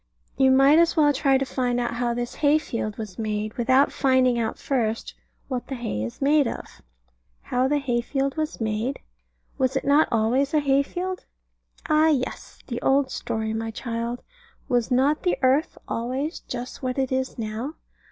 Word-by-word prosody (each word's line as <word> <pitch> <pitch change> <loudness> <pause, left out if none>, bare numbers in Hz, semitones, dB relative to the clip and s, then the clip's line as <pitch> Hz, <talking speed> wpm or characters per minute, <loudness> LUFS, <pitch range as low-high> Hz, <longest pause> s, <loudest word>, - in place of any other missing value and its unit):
You 265 -1 +4
might 270 +4 +6
as 335 0 +3
well 295 -2 +5
try 270 0 +3
to 270 - -1
find 250 -2 -1
out 240 -1 -1
how 235 0 -1
this 240 0 -3
hay 295 0 +3
field 225 -8 -4
was 215 -4 -7
made, 215 0 -2
without 260 +4 +3
finding 260 -3 +3
out 225 -1 -2
first 230 -5 -2 0.3
what 255 -2 -4
the 270 - -4
hay 230 - -3
is 115 - -5
made 290 -1 +4
of. - - -7 0.6
How 250 +1 +1
the 295 +2 +2
hay 245 -4 0
field 270 +2 -2
was 310 +1 -3
made? 225 +4 -2 0.6
Was 260 0 +1
it 270 - -1
not 285 +3 +4
always 250 +6 +1
a - - +5
hay 275 -1 +3
field? 365 +5 -4 0.6
Ah, 310 0 +4
yes; 275 -5 -2
the 240 -1 -5
old 270 0 +2
story, 220 0 -3
my 225 0 -3
child: 235 +1 -4 0.4
Was 245 -2 +1
not 270 +4 +2
the 360 - +1
earth 270 +6 +2
always 260 +8 -3
just 250 +2 -7
what 255 -1 -2
it 265 -1 0
is 260 0 -1
now? 225 +7 -4
260 Hz, 180 wpm, -24 LUFS, 235-280 Hz, 0.6 s, might